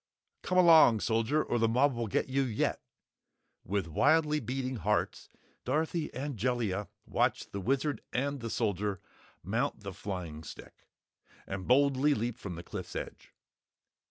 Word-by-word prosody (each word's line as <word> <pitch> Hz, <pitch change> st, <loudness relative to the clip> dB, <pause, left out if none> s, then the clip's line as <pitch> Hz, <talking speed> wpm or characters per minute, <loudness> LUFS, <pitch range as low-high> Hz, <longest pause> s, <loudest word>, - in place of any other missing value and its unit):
"Come 185 Hz, -, -1 dB
along, 160 Hz, -, +7 dB
Soldier, 115 Hz, -, +1 dB
or 120 Hz, -, -1 dB
the 115 Hz, -, +3 dB
mob 130 Hz, +4 st, +3 dB
will 120 Hz, -1 st, -3 dB
get 100 Hz, -, 0 dB
you 135 Hz, +1 st, +1 dB
yet!" 120 Hz, -5 st, -1 dB, 0.8 s
With 100 Hz, -1 st, -1 dB
wildly 150 Hz, -, +3 dB
beating 130 Hz, +1 st, -3 dB
hearts, 105 Hz, 0 st, -1 dB, 0.3 s
Dorothy 155 Hz, +4 st, -1 dB
and 135 Hz, 0 st, -5 dB
Jellia 105 Hz, -4 st, -1 dB, 0.2 s
watched -, -, 0 dB
the 100 Hz, -, -4 dB
Wizard 135 Hz, +3 st, 0 dB
and 140 Hz, +3 st, -1 dB
the 115 Hz, -1 st, -5 dB
Soldier 100 Hz, -3 st, -1 dB, 0.4 s
mount 115 Hz, -, -1 dB
the 100 Hz, -1 st, -6 dB
flying 90 Hz, -6 st, -6 dB
stick -, -, -12 dB, 0.6 s
and 95 Hz, -1 st, -5 dB
boldly 140 Hz, +2 st, +4 dB
leap 120 Hz, +2 st, -3 dB
from 95 Hz, -6 st, -6 dB
the 85 Hz, -, -8 dB
cliff's -, -, -7 dB
edge. -, -, -7 dB
120 Hz, 145 wpm, -31 LUFS, 100-140 Hz, 0.8 s, along